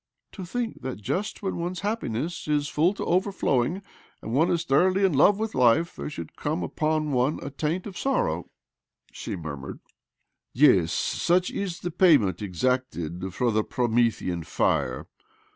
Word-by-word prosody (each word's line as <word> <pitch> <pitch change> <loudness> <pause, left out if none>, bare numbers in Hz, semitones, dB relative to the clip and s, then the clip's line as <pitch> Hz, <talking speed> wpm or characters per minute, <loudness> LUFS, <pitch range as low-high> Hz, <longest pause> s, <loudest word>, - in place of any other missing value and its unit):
" - - -57
To 190 - -8
think 230 +5 -4
that 130 0 -4
just 185 - -3
when 190 - -2
one's 175 +1 -3
happiness 175 - -3
is 145 -1 +1
full 170 +7 +2
to - - -4
overflowing, 180 - 0 0.4
and 110 - -5
one 155 +6 +3
is 170 -1 +1
thoroughly 185 +6 +3
in 185 - +2
love 195 +9 +5
with 220 0 -3
life, 130 +7 +3
there - - -5
should 85 - -8
come 90 - -2
upon 155 - -1
one 130 +3 +1
a 140 - -5
taint 155 +6 -2
of 195 - -8
sorrow! 90 - -1 0.3
" - - -63 0.3
she - - -5
murmured. 70 -5 -7 0.4
" - - -54
Yes; 115 - +5
such 180 +1 +1
is 190 -4 -4
the 175 - -3
payment 140 - +4
exacted 95 -4 -2
for 125 -2 +1
the 110 0 +1
Promethean 115 -8 0
fire. 65 -4 0
145 Hz, 165 wpm, -26 LUFS, 110-180 Hz, 0.4 s, love